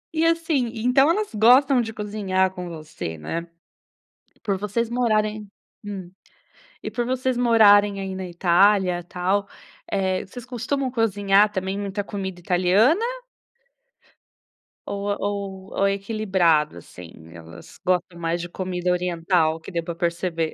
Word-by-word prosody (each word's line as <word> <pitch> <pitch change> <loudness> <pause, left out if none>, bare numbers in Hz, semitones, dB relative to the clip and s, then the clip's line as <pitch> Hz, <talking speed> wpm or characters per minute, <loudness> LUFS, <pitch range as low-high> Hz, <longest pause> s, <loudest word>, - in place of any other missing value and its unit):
E, 320 - +2
assim, 325 -8 +1
então 250 +6 +3
elas 415 - 0
gostam 250 +4 +5
de 225 -1 -4
cozinhar 200 -3 -1
com 180 -1 -7
você, 155 - -7
né? 165 - -5 1.0
Por 200 -2 -1
vocês 210 +4 -2
morarem 215 -3 0 0.3
Hum. 190 -3 -7 0.7
E - - -4
por 240 -1 -2
vocês 255 -1 -1
morarem 205 -4 +5
aí 195 -1 -4
na 185 -1 -5
Itália, 180 +1 +3
tal, 185 +3 -1 0.4
eh, 190 -1 -1
vocês 245 +4 -10
costumam 255 +2 -2
cozinhar 205 -3 +3
também 190 0 -3
muita 200 0 -3
comida 190 -3 -5
italiana 185 - +3 1.8
ou 200 0 -4
ou 200 -1 -4
ou 200 - +4
é 195 - +2
equilibrado 190 - +1
assim? 85 0 -12 0.2
Elas 85 -1 -13
gostam 180 -1 0
mais 170 +1 -1
de 175 - -6
comida 180 -1 -2
oriental, 170 -2 +1
que 195 - -10
deu 170 -1 -2
para 170 0 -5
perceber. 170 -1 -2
195 Hz, 135 wpm, -23 LUFS, 180-220 Hz, 1.8 s, gostam